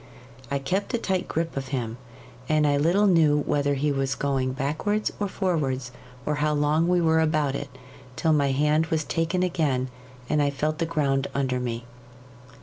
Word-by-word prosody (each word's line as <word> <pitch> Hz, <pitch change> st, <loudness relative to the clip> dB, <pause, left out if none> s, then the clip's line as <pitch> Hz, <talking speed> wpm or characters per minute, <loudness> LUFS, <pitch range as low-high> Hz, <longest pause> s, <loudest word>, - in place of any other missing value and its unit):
I 140 Hz, -, 0 dB
kept 190 Hz, -, -1 dB
a -, -, +2 dB
tight 190 Hz, -5 st, -1 dB
grip 165 Hz, +1 st, -2 dB
of 135 Hz, -1 st, -3 dB
him, 120 Hz, -3 st, -3 dB, 0.5 s
and 155 Hz, -1 st, +3 dB
I 145 Hz, -1 st, +3 dB
little 170 Hz, +8 st, +3 dB
knew 160 Hz, -6 st, +4 dB
whether 145 Hz, -1 st, +1 dB
he 145 Hz, +2 st, 0 dB
was 135 Hz, -1 st, -1 dB
going 135 Hz, -2 st, 0 dB
backwards 155 Hz, +11 st, -1 dB
or 205 Hz, -, 0 dB
forwards, 140 Hz, -10 st, -1 dB, 0.3 s
or 150 Hz, -, 0 dB
how 150 Hz, 0 st, +2 dB
long 150 Hz, +3 st, +2 dB
we 180 Hz, 0 st, +3 dB
were 160 Hz, -1 st, +3 dB
about 155 Hz, -3 st, +1 dB
it, 140 Hz, 0 st, -4 dB, 0.5 s
till 160 Hz, +2 st, +2 dB
my 140 Hz, -2 st, +2 dB
hand 150 Hz, +4 st, +2 dB
was 160 Hz, -1 st, 0 dB
taken 165 Hz, +4 st, 0 dB
again, 145 Hz, -8 st, 0 dB, 0.4 s
and 150 Hz, +2 st, +2 dB
I 145 Hz, -, +2 dB
felt 155 Hz, +3 st, -2 dB
the 165 Hz, -, 0 dB
ground 140 Hz, -4 st, 0 dB
under 130 Hz, -2 st, 0 dB
me. 120 Hz, -1 st, -4 dB
150 Hz, 180 wpm, -25 LUFS, 135-165 Hz, 0.5 s, knew